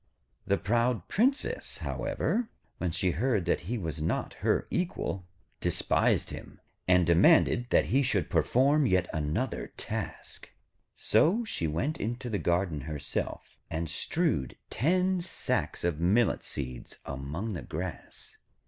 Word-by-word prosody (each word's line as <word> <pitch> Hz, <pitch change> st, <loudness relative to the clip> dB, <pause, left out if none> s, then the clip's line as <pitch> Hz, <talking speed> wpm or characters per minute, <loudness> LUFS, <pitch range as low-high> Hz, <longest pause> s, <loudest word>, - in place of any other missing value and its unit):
The 100 Hz, -, +3 dB
proud 115 Hz, -1 st, +1 dB
Princess, 265 Hz, +7 st, +1 dB
however, 235 Hz, 0 st, -1 dB, 0.3 s
when 90 Hz, -, 0 dB
she 90 Hz, +2 st, 0 dB
heard 105 Hz, -1 st, 0 dB
that 85 Hz, -, +1 dB
he 120 Hz, -, 0 dB
was 80 Hz, -6 st, -4 dB
not 80 Hz, -, -1 dB
her -, -, +2 dB
equal, 135 Hz, -, -2 dB, 0.3 s
despised -, -, +1 dB
him, -, -, -9 dB, 0.3 s
and 90 Hz, -1 st, +5 dB
demanded 85 Hz, +8 st, +5 dB
that -, -, +4 dB
he 135 Hz, -, +5 dB
should 130 Hz, -, +1 dB
perform 140 Hz, +3 st, +3 dB
yet 95 Hz, -2 st, +2 dB
another 75 Hz, -1 st, -2 dB
task. -, -, -6 dB, 0.5 s
So 180 Hz, -, +3 dB
she 85 Hz, -, -2 dB
went 125 Hz, -, -1 dB
into 120 Hz, +3 st, -3 dB
the 100 Hz, -, 0 dB
garden 85 Hz, -3 st, 0 dB
herself, 75 Hz, 0 st, -4 dB
and 80 Hz, 0 st, -2 dB
strewed 85 Hz, -, 0 dB
ten 180 Hz, -, +2 dB
sacks 175 Hz, -, -1 dB
of 85 Hz, -3 st, 0 dB
millet 100 Hz, +6 st, +2 dB
seeds 65 Hz, -3 st, -6 dB
among 75 Hz, -, -4 dB
the 85 Hz, -, -4 dB
grass. 85 Hz, +1 st, -7 dB
95 Hz, 130 wpm, -29 LUFS, 80-130 Hz, 0.5 s, and